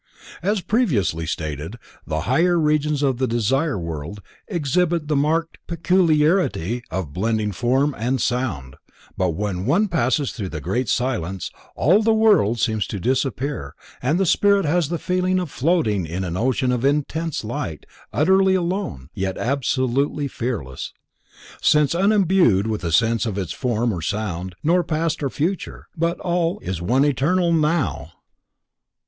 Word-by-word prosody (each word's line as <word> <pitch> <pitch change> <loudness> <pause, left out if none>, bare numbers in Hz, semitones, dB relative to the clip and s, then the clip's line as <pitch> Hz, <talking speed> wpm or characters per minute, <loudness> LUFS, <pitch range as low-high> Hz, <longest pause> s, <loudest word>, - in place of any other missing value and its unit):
As 200 +2 0
previously 115 - 0
stated, 80 - -4 0.3
the 80 0 -1
higher 170 - +2
Regions 150 -1 +1
of 135 -3 +1
the 130 - +1
Desire 130 +6 0
World 85 +2 -5 0.3
exhibit 170 -1 0
the 150 - +1
marked 160 +3 0
peculiarity 165 - +2
of 90 -7 -4
blending 110 +2 0
form 130 +8 +1
and 125 +5 -1
sound, 95 - -2 0.4
but 90 -4 0
when 100 0 -3
one 190 +10 +3
passes 145 -5 0
through 100 -6 -5
the 80 - -5
Great 105 - -2
Silence, 95 -8 -1 0.2
all 185 +10 +4
the 225 0 +3
world 205 - +4
seems 110 -2 0
to 100 - -5
disappear 130 +4 -2 0.3
and 150 +8 +1
the 195 - +2
spirit 200 +2 +3
has 160 0 +1
the 170 - -1
feeling 185 +2 0
of 175 -6 -4
floating 120 - +1
in 90 +4 -3
an 85 -2 -3
ocean 125 +4 +1
of 125 -1 -1
intense 150 +2 0
light, 95 -8 -5 0.3
utterly 190 +4 +3
alone, 175 - -2
yet 95 0 -3
absolutely 135 +2 0
fearless, 115 - -4 0.7
since 150 -1 +4
unimbued 185 - +3
with 110 -3 -2
a 85 - -1
sense 115 +5 +2
of 105 -3 -3
its 95 -5 -3
form 120 -3 0
or 85 - -4
sound, 95 -1 -3
nor 175 +3 +3
past 165 0 -1
or 140 - 0
future, 170 +8 -3
but 170 +2 -1
all 175 +1 0
is 90 -3 -4
one 125 +10 +2
eternal 170 +6 +2
NOW. 155 -1 0
135 Hz, 150 wpm, -22 LUFS, 105-170 Hz, 0.7 s, all